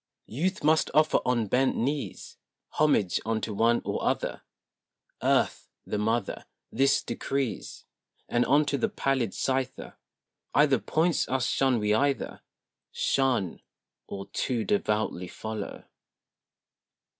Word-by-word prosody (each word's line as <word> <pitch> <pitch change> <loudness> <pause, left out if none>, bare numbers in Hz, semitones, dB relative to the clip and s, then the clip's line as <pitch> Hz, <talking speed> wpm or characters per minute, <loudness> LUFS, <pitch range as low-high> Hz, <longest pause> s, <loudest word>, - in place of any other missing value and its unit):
II - - -11
Youth 185 +6 -1
must 155 +1 +3
offer 155 0 +4
on 120 -3 +1
bent 130 +6 +2
knees 140 +4 -3 0.3
Homage 145 -12 +2
unto 110 -1 -2
one 115 +3 +2
or - - -2
other; - - -1 0.8
Earth, - - +1 0.2
the 105 - -2
mother, 110 +3 -1 0.2
This 135 0 +3
decrees; 135 -4 -3 0.4
And 120 - +2
unto 145 0 +3
the - - +1
pallid 130 -7 0
Scyther 130 0 -2 0.6
Either 140 -4 +5
points 160 - +1
us 130 -2 +1
shun 130 -1 +2
we 105 -1 +1
either 140 +4 0 0.5
Shun 125 -10 0 0.5
or 100 0 -6
too 120 +2 -1
devoutly 110 - 0
follow. 110 +1 -6
130 Hz, 115 wpm, -28 LUFS, 110-140 Hz, 0.8 s, Either